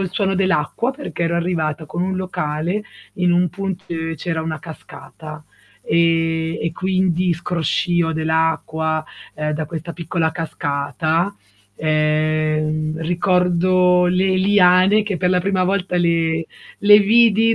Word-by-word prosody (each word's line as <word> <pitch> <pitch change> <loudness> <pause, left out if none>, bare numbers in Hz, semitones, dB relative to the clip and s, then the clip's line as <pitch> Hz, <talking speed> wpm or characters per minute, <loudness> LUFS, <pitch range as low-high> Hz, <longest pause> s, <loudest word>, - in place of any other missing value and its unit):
il 190 -2 -2
suono 195 -2 0
dell'acqua 185 - 0
perché 270 - -6
ero 170 0 0
arrivata 160 -3 -2
con 170 +3 -4
un 190 0 -2
locale 180 +1 -3 0.3
in 180 -1 +1
un 175 +1 +2
punto 195 +1 -5
dove 165 -1 -3
c'era 160 +1 -3
una 160 -1 -4
cascata 155 -1 -11 0.4
e 165 -1 +1
e 165 - -1
quindi 185 -1 0
scroscio 175 0 -1
dell'acqua, 160 0 -1 0.3
ehm, 150 0 -2
da 155 +1 -3
questa 165 +2 -6
piccola 165 -1 -1
cascata, 160 +3 -2 0.4
ehm, 155 0 0
ricordo 180 +1 +2
le 185 +1 +1
liane 190 +1 +4
che 205 -3 -3
per 180 +1 0
la 180 -1 +2
prima 185 0 0
volta 185 -1 -1
le 165 -1 +1 0.4
le 205 0 +7
vidi 225 +1 +4
170 Hz, 130 wpm, -19 LUFS, 160-185 Hz, 0.4 s, le